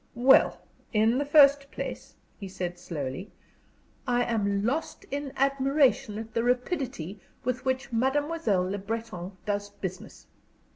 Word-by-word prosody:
"Well, 255 +3 +5 0.3
in 225 +4 +3
the 285 - 0
first 280 -1 +6
place," - - -6 0.2
he 200 - -6
said, 180 -1 -5
slowly, 165 +1 -5 0.8
"I 245 -1 +2
am 200 -4 0
lost 295 +7 -2
in 280 0 -3
admiration 275 -4 +2
at 220 0 -7
the 230 - +1
rapidity 245 - -1 0.2
with 250 0 -2
which 260 -2 -1
Mademoiselle 265 - +1
Le 200 +2 -3
Breton 200 -3 -5
does 205 -1 -2
business. 190 -2 -8
235 Hz, 130 wpm, -28 LUFS, 200-270 Hz, 0.8 s, first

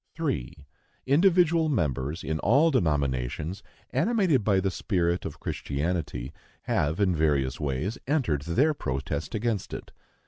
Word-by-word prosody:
3. 75 +4 -3 0.4
Individual 165 +2 +4
members, 75 - -1
in 80 0 -2
all 140 - +4
denominations, 75 - 0 0.3
animated 190 - +2
by 100 -2 +3
the 95 0 0
spirit 85 -2 0
of - - -6
Christianity, 75 -3 -3 0.3
have 75 +5 0
in 95 -4 +3
various 70 -5 +1
ways 75 - -2
entered 130 - +1
their 125 - +2
protest 70 - -3
against 110 -2 -2
it. - - -9
85 Hz, 125 wpm, -27 LUFS, -, 0.4 s, Individual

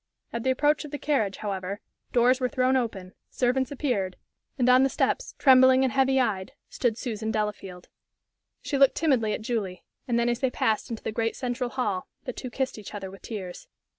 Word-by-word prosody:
At 235 - -2
the 260 - 0
approach 290 +3 +2
of 300 - -8
the 290 - -4
carriage, 245 -11 0
however, 195 -1 -4 0.3
doors 250 +2 +4
were 250 -1 0
thrown 255 +1 +2
open, 205 -7 -2 0.2
servants 255 +1 +1
appeared, 245 -10 -1 0.4
and 250 -2 +2
on 255 +1 +7
the 270 - +3
steps, - - -1
trembling 260 -1 +6
and 260 - +1
heavy 265 0 +3
eyed, 195 -7 -1 0.2
stood 235 -3 0
Susan 220 -3 -3
Delafield. 210 -4 -3 0.8
She 280 - -1
looked 275 -1 +6
timidly 260 -9 +2
at 215 - -4
Julie, 210 -6 -3 0.2
and 240 -2 +1
then, 235 0 +2
as 240 0 0
they 265 - +1
passed 220 -3 0
into 230 -2 -6
the - - -2
great 225 +1 -1
central 250 0 -2
hall, 210 -8 -2 0.2
the 250 - -5
two 255 - -6
kissed 265 -2 -3
each 210 0 -9
other 195 -2 -6
with 195 - -13
tears. 190 -6 -7
240 Hz, 195 wpm, -26 LUFS, 210-260 Hz, 0.8 s, on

